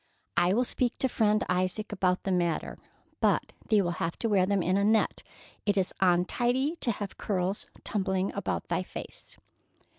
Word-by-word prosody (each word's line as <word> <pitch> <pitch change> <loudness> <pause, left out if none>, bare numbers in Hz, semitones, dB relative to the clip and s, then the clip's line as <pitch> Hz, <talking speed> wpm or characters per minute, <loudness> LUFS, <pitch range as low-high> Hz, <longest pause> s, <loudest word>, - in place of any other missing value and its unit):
"I 175 +2 +3
will 245 - +3
speak 245 0 0
to 265 - +1
Friend 215 -3 +2
Isaac 185 +4 -1
about 185 -2 +1
the 195 - -1
matter, 175 -3 0 0.4
but - - +1 0.2
thee 210 -3 +4
will 175 - 0
have 165 0 -1
to 230 - -1
wear 190 -3 +3
them 200 -2 +1
in 185 +2 +1
a 200 - +2
net. 220 +1 +2 0.4
It 205 -1 +1
is 185 -1 +1
untidy 240 - +2
to 260 - -1
have 205 -3 -4
curls 190 0 -1 0.2
tumbling 190 -2 0
about - - -3
thy - - 0
face." - - -9
195 Hz, 175 wpm, -29 LUFS, 185-220 Hz, 0.4 s, thee